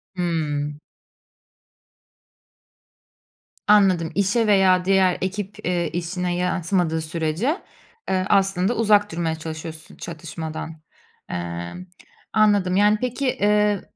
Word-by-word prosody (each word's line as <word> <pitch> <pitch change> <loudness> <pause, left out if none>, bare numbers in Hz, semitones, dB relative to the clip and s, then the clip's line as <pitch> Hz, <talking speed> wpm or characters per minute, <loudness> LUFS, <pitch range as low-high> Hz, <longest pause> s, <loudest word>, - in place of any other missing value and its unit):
Hıı. 155 -5 -1 3.0
Anladım. 190 -6 +4
İşe 205 +3 +2
veya 190 -3 +4
diğer 190 -2 +3
ekip, 195 0 -4
eee, 175 -2 0
işine 175 +1 -2
yansımadığı 175 -2 0
sürece, 165 - -1 0.5
eee, 185 -1 +1
aslında, 195 +2 +2
uzak 210 -2 +3
durmaya 165 -1 -1
çalışıyorsun 160 0 -8
çatışmadan. 160 -1 -7 0.5
Emm, 85 - -5 0.5
anladım, 205 -4 +3
yani, 210 +2 +4
peki, 250 +2 -2
eee, 210 -2 +2
180 Hz, 90 wpm, -23 LUFS, 160-205 Hz, 3.0 s, Anladım